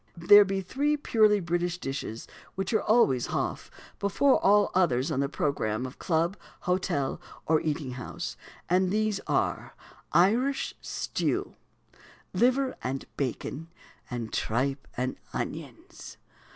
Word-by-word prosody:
There 205 Hz, +5 st, +8 dB
be 195 Hz, 0 st, -2 dB
three 290 Hz, +10 st, 0 dB
purely 215 Hz, -7 st, +3 dB
British 175 Hz, 0 st, -1 dB
dishes 135 Hz, -7 st, -5 dB, 0.3 s
which 195 Hz, +3 st, -2 dB
are 215 Hz, -, +3 dB
always 140 Hz, -, +3 dB
"hoff" -, -, -3 dB, 0.3 s
before 260 Hz, +7 st, +3 dB
all 205 Hz, +1 st, +5 dB
others 150 Hz, -6 st, +2 dB
on 135 Hz, -, 0 dB
the 140 Hz, 0 st, 0 dB
programme 125 Hz, -6 st, -1 dB
of 130 Hz, -, -9 dB
club, 170 Hz, +2 st, +1 dB, 0.3 s
hotel, 180 Hz, -6 st, -1 dB, 0.2 s
or 160 Hz, -1 st, +3 dB
eating 150 Hz, -4 st, -2 dB
house; 130 Hz, +7 st, -6 dB, 0.3 s
and 185 Hz, +1 st, +2 dB
these 215 Hz, 0 st, 0 dB
are, -, -, -1 dB, 0.4 s
Irish 235 Hz, +10 st, +2 dB
stew, -, -, -2 dB, 0.8 s
liver 255 Hz, +2 st, +2 dB
and 130 Hz, +1 st, -3 dB
bacon, 140 Hz, +4 st, -3 dB, 0.4 s
and 120 Hz, -3 st, -5 dB
tripe 135 Hz, +4 st, -1 dB
and 130 Hz, +1 st, -2 dB, 0.2 s
onions. -, -, -7 dB
175 Hz, 125 wpm, -28 LUFS, 135-205 Hz, 0.8 s, There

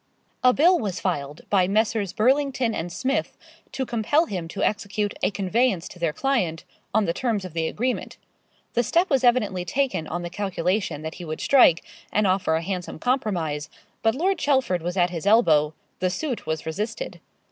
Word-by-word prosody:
A 250 Hz, -, +7 dB
bill 345 Hz, +7 st, +4 dB
was 195 Hz, -5 st, -3 dB
filed 145 Hz, -5 st, -3 dB
by 185 Hz, -3 st, +4 dB
Messrs. 210 Hz, -1 st, +1 dB
Burlington 260 Hz, +1 st, +2 dB
and 175 Hz, -1 st, -4 dB
Smith, 265 Hz, +9 st, -2 dB, 0.3 s
to 265 Hz, 0 st, -2 dB
compel 240 Hz, +8 st, +2 dB
him 180 Hz, -, -4 dB
to -, -, -4 dB
execute 205 Hz, 0 st, -1 dB
a -, -, +2 dB
conveyance 200 Hz, 0 st, 0 dB
to 180 Hz, -, -13 dB
their 170 Hz, -2 st, +1 dB
client 185 Hz, -, -1 dB, 0.3 s
on 215 Hz, 0 st, +2 dB
the 170 Hz, -, 0 dB
terms 220 Hz, -5 st, -1 dB
of 180 Hz, -, -8 dB
the 165 Hz, -1 st, 0 dB
agreement. 250 Hz, +7 st, -2 dB, 0.6 s
The 240 Hz, -, +3 dB
step 340 Hz, -, +1 dB
was 265 Hz, -2 st, +3 dB
evidently 215 Hz, -7 st, +2 dB
taken 240 Hz, -, -1 dB
on 175 Hz, +1 st, -4 dB
the 175 Hz, -, -5 dB
calculation 185 Hz, -4 st, -1 dB
that 160 Hz, 0 st, -4 dB
he -, -, -6 dB
would 155 Hz, 0 st, -5 dB
strike, 245 Hz, -12 st, +5 dB, 0.3 s
and 210 Hz, +1 st, +2 dB
offer 185 Hz, -4 st, +2 dB
a 165 Hz, -, -1 dB
handsome 180 Hz, 0 st, -4 dB
compromise; 170 Hz, -, -1 dB, 0.3 s
but 225 Hz, +1 st, +2 dB
Lord 365 Hz, +5 st, +1 dB
Chelford 260 Hz, -, +1 dB
was 175 Hz, +3 st, -3 dB
at 175 Hz, -1 st, +3 dB
his 170 Hz, +2 st, -4 dB
elbow 160 Hz, -9 st, +4 dB, 0.2 s
the 185 Hz, -, +1 dB
suit 255 Hz, -, -3 dB
was 160 Hz, 0 st, -2 dB
resisted. 210 Hz, -, -4 dB
200 Hz, 180 wpm, -24 LUFS, 170-250 Hz, 0.6 s, A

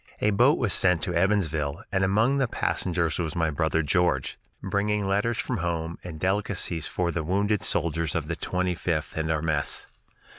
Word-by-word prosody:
A 105 Hz, -, +2 dB
boat 125 Hz, +8 st, +4 dB
was 115 Hz, -6 st, 0 dB
sent 90 Hz, -3 st, +3 dB
from 90 Hz, -, -3 dB
Evansville, 85 Hz, -3 st, +1 dB
and 95 Hz, 0 st, +1 dB
among 110 Hz, +8 st, +3 dB
the 135 Hz, -, +2 dB
passengers 85 Hz, -7 st, -1 dB
was 80 Hz, -3 st, -2 dB
my 80 Hz, -2 st, +1 dB
brother 80 Hz, +2 st, +1 dB
George, 90 Hz, +4 st, +1 dB, 0.3 s
bringing 100 Hz, +1 st, 0 dB
letters 105 Hz, +4 st, +1 dB
from 125 Hz, -, -2 dB
home 85 Hz, -2 st, -3 dB
and 85 Hz, -3 st, -7 dB
delicacies 95 Hz, -3 st, -1 dB
for 90 Hz, -1 st, -1 dB
the 80 Hz, -1 st, -2 dB
wounded 100 Hz, +5 st, +1 dB
soldiers 80 Hz, -1 st, 0 dB
of 80 Hz, -3 st, -1 dB
the 85 Hz, -, -2 dB
Twenty 90 Hz, +2 st, -1 dB
fifth 80 Hz, -2 st, -2 dB
and 80 Hz, 0 st, -1 dB
our 80 Hz, -1 st, 0 dB
mess. 75 Hz, -3 st, -1 dB
90 Hz, 180 wpm, -26 LUFS, 80-100 Hz, 0.3 s, boat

